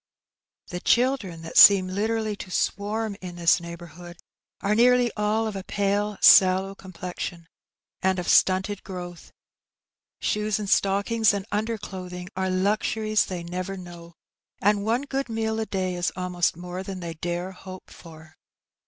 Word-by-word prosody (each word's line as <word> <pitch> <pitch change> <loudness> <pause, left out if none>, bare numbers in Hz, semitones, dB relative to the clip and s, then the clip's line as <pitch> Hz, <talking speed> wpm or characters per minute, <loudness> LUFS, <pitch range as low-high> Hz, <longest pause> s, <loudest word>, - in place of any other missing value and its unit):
The 180 0 -5
children^ 235 -10 +1
that 165 - +2
seem 195 -2 +9
literally 215 +3 -1
to 185 - -8
swarm 205 +3 -2
in 180 -2 -7
this 170 0 +3
neigh 170 0 -7
bourhood^ 175 +1 -12 0.4
are 200 - 0
nearly 245 +1 +4
all 210 +1 0
of 215 -2 -4
a 195 - -5
pale, 205 +1 -1
sallow 190 +1 +6
complexion, 180 -2 -7 0.5
and 190 0 +1
of 180 - -3
stmited 190 +2 +3
growth. 175 -3 -9 0.9
Shoes 210 -1 0
and 210 -1 -5
stockings 200 +3 +2
and 195 -1 -4
underclothing 190 -4 -4
are 190 0 -1
luxuries 215 +3 0
they 180 -2 -5
never 185 +3 -5
know, 170 -2 -11 0.4
and 205 0 +2
one 230 +5 0
good 275 -2 -3
meal 220 0 -2
a 220 - -2
day 185 -2 -2
is 175 0 -1
almost 180 -2 -1
more 180 +1 -6
than 190 -1 -6
they 170 -2 -5
dare 175 +3 -4
hope 185 0 -11
for. 155 -2 -14
190 Hz, 150 wpm, -25 LUFS, 180-210 Hz, 0.9 s, seem